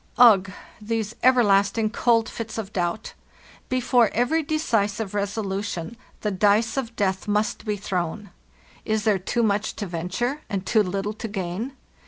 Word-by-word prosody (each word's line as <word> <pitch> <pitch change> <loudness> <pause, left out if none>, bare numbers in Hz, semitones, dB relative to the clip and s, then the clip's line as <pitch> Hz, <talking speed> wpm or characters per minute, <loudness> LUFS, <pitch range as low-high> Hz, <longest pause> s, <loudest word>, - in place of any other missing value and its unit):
"Ugh! 205 -6 +6 0.3
These 220 0 -2
everlasting 215 -3 +4
cold 230 -1 +2
fits 230 -1 -6
of 210 -2 -5
doubt! 175 +4 -2 0.6
Be 255 - +1
fore 245 -3 +4
every 250 +8 +2
decisive 225 -10 -1
resolution 200 -1 -3 0.3
the 210 - -1
dice 210 +4 +2
of 240 -4 -3
death 190 -2 -1
must 210 +2 0
be 210 -1 -1
thrown. 190 +1 -3 0.5
Is 215 -1 0
there 210 -3 +2
too 235 +6 -1
much 210 -1 0
to 205 - -4
venture, 190 - -3
and 195 -2 -3
too 220 +3 +3
little 200 +2 -2
to 220 +2 -6
gain? 200 +5 -4
210 Hz, 150 wpm, -24 LUFS, 195-230 Hz, 0.6 s, Ugh